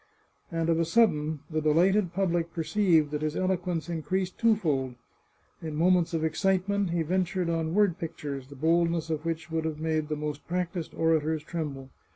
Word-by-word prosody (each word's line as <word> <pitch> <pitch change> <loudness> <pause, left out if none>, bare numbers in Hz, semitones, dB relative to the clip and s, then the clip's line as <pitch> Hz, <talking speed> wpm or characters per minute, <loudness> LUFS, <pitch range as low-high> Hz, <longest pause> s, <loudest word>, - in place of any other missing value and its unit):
And 165 -1 -1
of 165 0 +2
a - - +3
sudden 160 -6 +2
the 155 -1 -2
delighted 175 +5 +3
public 175 -2 0
perceived 165 -3 +2
that 150 0 -2
his 155 0 -1
eloquence 180 -3 -1
increased 175 +3 -2
twofold. 155 - +1 0.7
In 155 -2 -5
moments 175 +1 +3
of 160 - -1
excitement 190 +4 +1
he 170 -1 0
ventured 180 +1 0
on 165 0 -1
word 205 -4 +3
pictures, 145 -5 -5
the 140 - -12
boldness 165 +2 +1
of 155 0 -3
which 165 -1 -3
would 160 0 -1
have 155 -1 -3
made 155 -1 -1
the 155 - -1
most 150 -1 -5
practised 175 -1 -3
orators 160 -1 +1
tremble. 145 -5 -5
165 Hz, 170 wpm, -28 LUFS, 155-180 Hz, 0.7 s, a